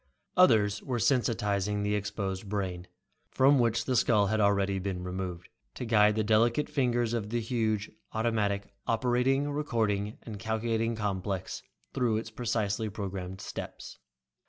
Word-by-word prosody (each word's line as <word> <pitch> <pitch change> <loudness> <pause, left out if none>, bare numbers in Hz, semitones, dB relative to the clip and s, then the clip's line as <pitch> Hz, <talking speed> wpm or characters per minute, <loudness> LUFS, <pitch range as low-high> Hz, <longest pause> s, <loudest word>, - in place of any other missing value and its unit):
Others 110 - +4
were 125 -2 -2
sensitizing 105 -5 +1
the 105 0 0
exposed 100 -1 -3
brain, 95 -3 -3 0.4
from 135 +1 +4
which 115 -1 +1
the 130 - 0
skull 110 -3 +4
had 110 +2 0
already 100 -1 +2
been 95 -1 -3
removed, 90 -1 -5 0.3
to - - -4
guide 105 -2 +4
the 110 - +1
delicate 115 +6 +3
fingers 120 -4 +1
of 110 -3 -2
the 120 +1 0
huge 110 -3 -1 0.2
automatic 105 -3 -1
Operating, 125 +4 +2
Recording 110 -8 -1
and 105 -3 -7
Calculating 115 +1 -1
Complex 100 -3 -3 0.3
through 115 -4 +1
its 110 0 -5
precisely 110 -2 -1
programmed 95 -2 -5
steps. - - -7
110 Hz, 135 wpm, -29 LUFS, 100-120 Hz, 0.4 s, Others